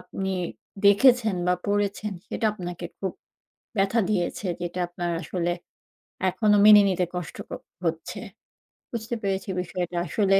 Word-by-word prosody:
আপনি 190 0 -4 0.5
দেখেছেন 220 0 +6
বা 180 - +4
পড়েছেন 205 0 0 0.2
সেটা - - -3
আপনাকে 175 -3 -6
খুব 190 -2 -2 0.7
ব্যথা 195 +4 +3
দিয়েছে, 190 0 -1
যেটা 175 +1 -3
আপনার 175 0 -3
আসলে 175 -1 -1 0.8
এখনও 210 +1 +3
মেনে 210 -1 +10
নিতে 180 -1 +1
কষ্ট 180 -3 -4
ক - - -18 0.3
হচ্ছে। 165 -1 -2 0.7
বুঝতে 235 0 -3
পেরেছি 195 -1 -2
বিষয়টা। 180 0 -4
আসলে 195 +1 +3
195 Hz, 125 wpm, -26 LUFS, 180-210 Hz, 0.8 s, মেনে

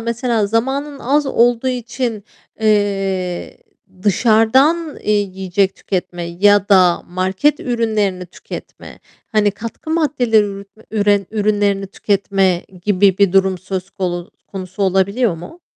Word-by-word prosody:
mesela 235 -2 0
zamanın 270 +6 -1
az 285 +3 +1
olduğu 240 0 +2
için, 240 -3 -3 0.4
eee, 195 -4 0 0.4
dışarıdan 250 - +3
eee 210 - -4
yiyecek 190 -1 0
tüketme 180 -2 -4
ya 200 +4 +2
da 185 -4 +4
market 190 +11 0
ürünlerini 215 -7 -1
tüketme, - - -10 0.3
hani, 210 -1 +3
katkı 225 +9 -8
maddeleri 225 -11 +1 0.3
üre 205 -3 +2
ürünlerini 205 -2 0
tüketme 195 -2 0 0.2
gibi 195 -1 +3
bir 200 -3 +3
durum 190 -1 +3
söz 185 +1 -5
konu 180 -3 -4 0.2
konusu 190 0 -5
olabiliyor 195 +3 +1
mu? 325 - -11
205 Hz, 110 wpm, -18 LUFS, 190-230 Hz, 0.4 s, da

